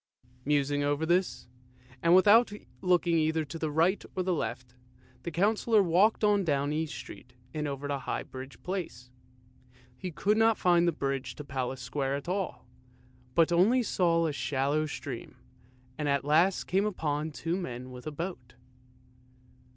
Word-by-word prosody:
Musing 145 0 +1
over 145 +2 0
this, 175 +3 0 0.5
and 170 +1 +5
without 210 +5 +6 0.3
looking 175 -2 +3
either 160 0 +1
to 150 +3 -8
the 155 - -1
right 165 +6 +2
or 185 - 0
the 185 0 0
left, 125 -4 -4 0.5
the - - -4
Councillor 210 +5 +2
walked 190 +6 +3
on 205 -1 +4
down 145 -3 0
East 160 0 -2
Street 125 - -10 0.2
and 150 -1 -2
over 140 0 -4
the 140 -1 -2
High - - -3
Bridge 130 +1 -10
Place. 165 -10 -5 0.8
He 185 - -5
could 200 +6 +1
not 225 0 +4
find 175 -1 +3
the - - +4
bridge 135 -3 -3
to 150 - -8
Palace 130 -2 -4
Square 135 +2 -2
at 140 +2 -6
all, 190 +1 -3 0.7
but 165 0 +4
only 215 +9 +4
saw 170 -5 +2
a 155 - -1
shallow 145 +2 0
stream, 130 -4 -7 0.6
and 150 -1 0
at 140 0 +1
last 165 +6 +3
came 195 +3 +1
upon 155 -6 -2
two 165 +3 -3
men 130 -8 -5
with 125 +3 -9
a - - -3
boat. 145 -6 -6
160 Hz, 160 wpm, -29 LUFS, 140-185 Hz, 0.8 s, without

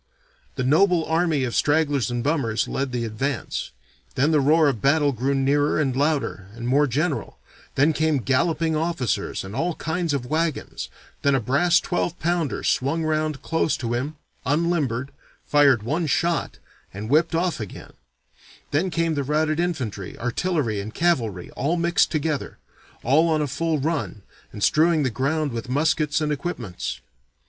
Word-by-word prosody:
The 130 - -2
noble 165 +5 +3
army 160 -3 +1
of 120 -2 -2
stragglers 145 -4 +2
and 120 -1 -2
bummers 135 -7 0
led 135 -1 -2
the 120 -1 -2
advance 120 +4 -3 0.5
then 140 +5 +2
the 155 - +4
roar 155 +3 +4
of 125 -7 -1
battle 145 +1 +3
grew 135 +3 -1
nearer 145 +3 +2
and 135 -4 0
louder 140 -9 0
and 120 0 -5
more 145 +4 +3
general, 145 +4 -2 0.4
then 145 +4 +4
came 155 -1 +1
galloping 155 +5 +1
officers 155 - -1
and 95 +3 -8
all 165 +5 -1
kinds 165 +1 -2
of 130 -3 -3
wagons, 160 +3 -2 0.3
then 140 -1 +3
a - - +2
brass 155 +9 +3
twelve 175 -1 -2
pounder 170 -3 -1
swung 150 +5 +1
round 155 -2 -1
close 160 -1 0
to 120 -2 -3
him, 135 +6 -2 0.3
unlimbered, 145 -4 0 0.3
fired 140 -6 +4
one 155 +8 -1
shot, 170 +4 0 0.3
and 105 +3 -6
whipped 160 +6 +3
off 175 -2 0
again 105 -4 -8 0.8
then 165 +6 +1
came 165 -1 0
the 145 - -1
routed 155 +3 0
infantry, 130 - -3
artillery, 120 - -1
and 105 +2 -8
cavalry, 115 - 0
all 155 +7 -1
mixed 170 +1 +2
together, 155 -2 -2 0.5
all 155 +7 +4
on 155 -1 +2
a - - 0
full 155 +3 -1
run, 145 - -2 0.3
and 105 - -5
strewing 160 0 +4
the 130 - 0
ground 145 +5 0
with 115 +1 -5
muskets 150 +2 +1
and 150 -1 0
equipments. 130 - -4
145 Hz, 160 wpm, -23 LUFS, 130-160 Hz, 0.8 s, the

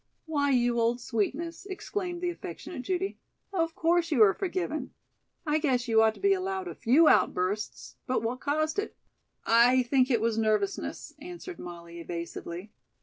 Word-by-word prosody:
"Why, 290 -3 0
you 240 -2 +2
old 235 +1 +2
sweetness," 310 - -2
exclaimed 370 -2 -4
the 355 -1 0
affectionate 250 - -7
Judy, 375 +6 -2 0.3
"of 330 -3 0
course, 340 +1 +2
you 245 -7 +6
are 195 -2 +5
forgiven. 350 -7 -3 0.5
I 305 0 +2
guess 255 -5 +1
you 225 -1 +5
ought 220 0 +3
to - - -14
be 395 0 +4
allowed 380 0 -2
a - - -5
few 285 +8 +4
outbursts. 200 -1 +1
But 255 -3 0
what 240 +3 -2
caused 310 +5 0
it?" 410 - -4 0.5
"I 245 +3 +5
think 255 +1 +2
it 240 -4 +3
was 225 0 0
nervousness," 225 - -1
answered 355 +2 -8
Molly 170 -1 -9
evasively. 170 +3 -6
270 Hz, 160 wpm, -28 LUFS, 225-345 Hz, 0.5 s, you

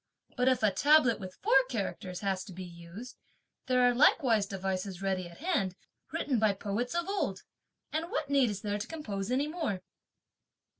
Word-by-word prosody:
But 250 0 +1
if 255 -4 +3
a 210 - +5
tablet 280 +3 +4
with 185 -2 -8
four 270 - +6
characters 195 -5 -4
has 190 -2 -1
to 190 - -10
be 185 +2 -7
used, 175 +7 -10 0.5
there 255 -1 +3
are 245 0 +5
likewise 240 -5 +4
devices 190 -1 -3
ready 185 -2 -1
at 170 - -14
hand, 245 - 0 0.4
written 260 -5 0
by 215 -2 +3
poets 210 - -3
of 345 +1 0
old; 400 +1 -2 0.5
and 320 +2 -1
what 475 - -2
need 275 -4 +3
is 200 -2 -4
there 205 0 -1
to 210 - -4
compose 210 -11 -4
any 270 +4 +1
more?" 300 - -3
215 Hz, 180 wpm, -31 LUFS, 190-265 Hz, 0.5 s, four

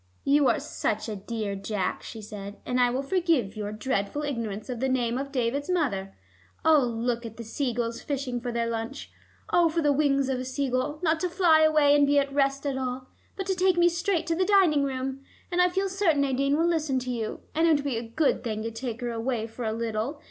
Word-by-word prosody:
"You 285 0 +4
are - - +3
such - - -2
a 215 - -3
dear, 205 0 -4
Jack," 195 -1 -2
she 220 -2 -9
said, 205 -1 -8
"and 250 0 0
I 245 0 +5
will 255 +3 -1
forgive 305 - +1
your 210 -1 -4
dreadful 215 +4 -2
ignorance 230 -7 -3
of 250 -3 -4
the 265 +2 0
name 245 -1 0
of 275 0 -5
David's 270 +3 -1
mother. 220 - -1 0.5
Oh, 315 -2 +7
look 235 -1 -1
at 225 -2 -8
the 235 - -6
sea 245 +4 -2
gulls 235 0 -3
fishing 265 -4 -3
for 245 0 -3
their 235 0 0
lunch. 230 +4 -4 0.4
Oh, 345 -1 +5
for 330 0 -1
the 290 -1 +4
wings 275 -2 +2
of 265 -1 -1
a - - -3
sea 260 +1 -2
gull, 255 +4 -1
not 320 -1 +2
to 360 - -1
fly 340 -3 +4
away 305 -2 +5
and 290 -1 +4
be 285 0 +3
at 275 -1 +1
rest 275 0 +1
at 270 -2 -1
all, 255 0 -4 0.3
but 385 - -4
to 385 - +1
take 365 0 +2
me 345 0 +5
straight 340 0 0
to 330 - 0
the 370 - +2
dining 370 -8 +4
room. 265 0 -3 0.3
And 355 0 +3
I 360 - +5
feel 385 +2 0
certain 375 -6 +2
Nadine 275 +1 +1
will 330 - +2
listen 310 -5 +1
to 255 0 -2
you, 225 -3 -4
and 325 +2 +3
it 320 - +5
would 285 - -1
be 275 -5 -1
a - - -2
good 245 +6 0
thing 215 -3 -3
to 225 - -3
take 230 +1 -5
her 240 -1 -2
away 230 0 -2
for 230 +1 -7
a 220 - 0
little. 230 +5 -3
265 Hz, 240 wpm, -27 LUFS, 230-305 Hz, 0.5 s, Oh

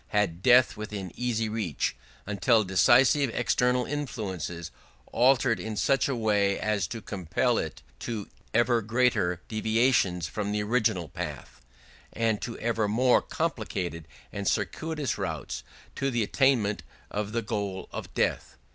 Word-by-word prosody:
had 95 -5 0
death 125 +3 +5
within 105 -3 -6
easy 115 -2 -1
reach... 105 -9 -2 0.3
until 105 +3 +3
decisive 125 - +4
external 125 +2 +2
influences 95 - -4 0.4
altered 125 -1 +3
in 110 -1 -4
such 135 +8 +2
a 135 - 0
way 105 -3 +1
as 105 -4 0
to 115 +2 -7
compel 105 +6 0
[it] 80 - -5 0.2
to 110 -4 -4 0.2
ever 120 0 +3
greater 110 -6 +1
deviations 110 -5 +1
from 105 -1 -3
the 105 0 0
original 105 -6 +1
path - - -4
of - - -7
life, - - -18 0.5
and 115 -2 0
to 115 - -5
ever 115 -2 0
more 120 +4 +4
complicated 100 - -3 0.3
and 100 -1 -3
circuitous 145 - -1
routes - - -4 0.3
to 135 - -1
the 120 -3 0
attainment 110 -5 +2 0.3
of 105 0 -3
the 115 +1 -1
goal 100 -3 -3
of - - -6
death. - - -1
110 Hz, 140 wpm, -28 LUFS, 100-125 Hz, 0.5 s, death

